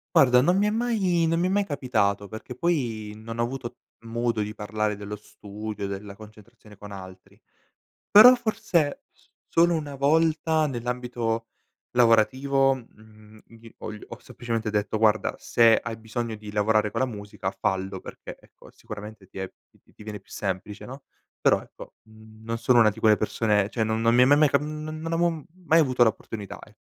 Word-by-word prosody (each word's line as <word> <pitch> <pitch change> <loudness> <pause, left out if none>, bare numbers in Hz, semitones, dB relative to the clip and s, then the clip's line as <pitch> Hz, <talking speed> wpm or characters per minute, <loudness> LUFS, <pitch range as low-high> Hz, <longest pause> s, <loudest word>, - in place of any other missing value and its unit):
Guarda 125 -2 +6
non 175 +6 +3
mi 205 - +3
è - - +2
mai 210 -7 +1
non 165 +1 +1
mi 180 - +2
è - - 0
mai 200 +1 +2
capitato 110 - -1
perché 110 +4 -8
poi 120 -9 -2
non 115 +1 -8
ho - - +2
avuto 120 0 -6 0.2
modo 115 -1 -2
di 105 +1 -5
parlare 105 0 -2
dello 105 +1 -7
studio, 105 0 -7
della 100 +1 -6
concentrazione 110 +1 -16
con 105 +1 -11
altri, 95 -1 -12 0.7
però 220 +5 +10
forse 215 - -1 0.5
solo 170 +1 +3
una 145 -3 -4
volta 160 +2 +2
nell'ambito 120 -2 -3 0.5
lavorativo, 130 +4 +3
mhmm, 110 -3 -17
gli 115 0 -16
ho - - -7
gl 105 0 -8
ho - - -10
semplicemente 115 -2 -4
detto: 105 +1 -1
"Guarda, 110 0 +2
se 115 -1 +4
hai 115 -1 -5
bisogno 115 0 -4
di 105 -1 -10
lavorare 105 0 +1
con - - -2
la 130 - +2
musica, 105 -4 -5
fallo, 95 0 -2
perché - - -10
ecco, - - -19
sicuramente 105 -1 -10
ti 95 - -12
è 95 - -5 0.3
ti - - -27
ti - - -15
viene 105 -1 -7
più - - -28
semplice, 100 +1 -4
no?" 135 +3 -10 0.4
Però - - +3
ecco, - - -13
mhmm, 110 0 -17
non 115 +1 -2
sono 125 +1 +3
una 110 -2 +6
di 110 +2 -11
quelle 110 -1 +5
persone 105 -2 +1
cioè, 115 +1 -2
non 110 0 0
non 115 +1 +3
mi 125 - +6
è - - +8
ma 145 +3 +5
mai 150 0 +5
cap 140 - +2
mhmm, 150 +1 -6
non 155 0 -6
non 165 +1 -4
avevo 165 -3 0 0.2
mai 165 0 +5
avuto 130 -5 +3
la 110 - +4
opportunità 105 -2 -9
e - - -16
115 Hz, 190 wpm, -25 LUFS, 105-140 Hz, 0.7 s, però